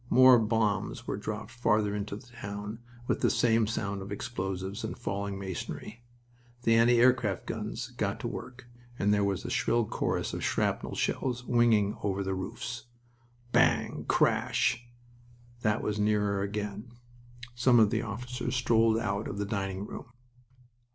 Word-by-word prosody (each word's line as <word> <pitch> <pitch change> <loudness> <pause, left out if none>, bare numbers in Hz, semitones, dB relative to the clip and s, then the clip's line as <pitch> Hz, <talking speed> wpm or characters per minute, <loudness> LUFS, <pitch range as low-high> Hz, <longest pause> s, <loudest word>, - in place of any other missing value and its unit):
More 130 -1 +8
bombs 110 +2 0
were - - -2
dropped 105 +2 -5
farther 110 -3 +1
into 105 0 -3
the 105 - -11
town, 105 -2 -7 0.3
with - - -1
the - - +4
same 115 -2 +3
sound 100 -3 -2
of 100 +1 -8
explosives 95 -3 -4
and - - -4
falling 100 -4 -3
masonry. 100 +4 -6 0.6
The 115 - +4
anti 115 +1 +5
aircraft 120 -5 +3
guns - - -4
got - - -2
to - - -2
work 125 0 -7 0.3
and 105 -2 +2
there 100 -1 +2
was 100 -2 0
the - - -5
shrill 120 -1 +2
chorus - - -2
of - - -4
shrapnel - - 0
shells 125 -2 -1
winging 115 -4 +3
over 100 -1 -1
the 95 0 -2
roofs. 120 +6 -5 0.6
"Bang!... - - +2
Crash!" 120 +1 +2 0.7
That 105 -1 +1
was 105 0 -1
nearer 105 -1 +2
again. 105 +3 -4 0.6
Some 120 0 +4
of 110 -2 +5
the 110 - +1
officers 125 +2 -4
strolled 115 -2 +3
out 105 -2 -1
of 100 - -5
the 105 - -1
dining 100 -1 -3
room. - - -8
105 Hz, 150 wpm, -29 LUFS, 100-120 Hz, 0.7 s, More